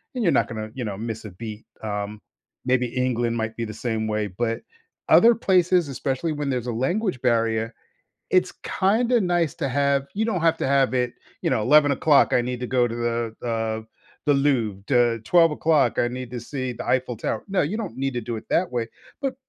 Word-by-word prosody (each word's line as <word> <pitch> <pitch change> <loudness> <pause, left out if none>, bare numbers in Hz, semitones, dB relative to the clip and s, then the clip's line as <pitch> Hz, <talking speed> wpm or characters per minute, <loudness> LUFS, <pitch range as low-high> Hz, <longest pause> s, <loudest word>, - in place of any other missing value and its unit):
and 245 - -1
you're 170 - +4
not - - +2
gonna, 110 -1 -6
you 125 -1 -4
know, 105 -2 -3
miss 110 0 -5
a 105 - -7
beat. 110 +3 -8 0.2
Um, 105 0 -4 0.4
maybe 125 -1 +2
England 120 -1 -1
might 110 -1 -3
be 115 - -2
the 110 - -7
same 110 -1 -2
way. 105 -1 -1
But, 115 +4 -2 0.5
other 235 +1 +7
places, 180 -6 +3
especially 135 +3 -2
when 145 -2 -2
there's 125 -2 -2
a - - -1
language 155 - -1
barrier, 115 -2 +1 0.6
it's 185 - +3
kinda 235 +5 +2
nice 175 -5 +1
to - - -2
have 140 0 +1
you 215 - +1
don't 215 -7 -1
have 165 0 +3
to - - -1
have 135 -1 +3
it, 125 -1 0 0.3
you - - 0
know, - - +1
"11:00, 145 +2 +5
I 125 - +4
need 125 0 -3
to 125 - -4
go 125 -1 +2
to 115 - -5
the 120 0 -3
uh, 110 -1 -1 0.4
the 145 - +4
Louvre. 120 -9 +1
The 120 -3 +2
12:00, 160 -5 +3
I 120 - +3
need 125 0 -6
to 125 - -4
see 130 +1 -4
the - - -7
Eiffel 125 -2 0
Tower." - - -3
No, 195 -1 +1
you 175 +9 -1
don't 215 - -5
need 135 0 -1
to 120 - -2
do 115 +1 -4
it 110 - -8
that 180 -3 +1
way, 120 -2 -1 0.3
but 270 -2 -2
125 Hz, 210 wpm, -24 LUFS, 115-150 Hz, 0.6 s, other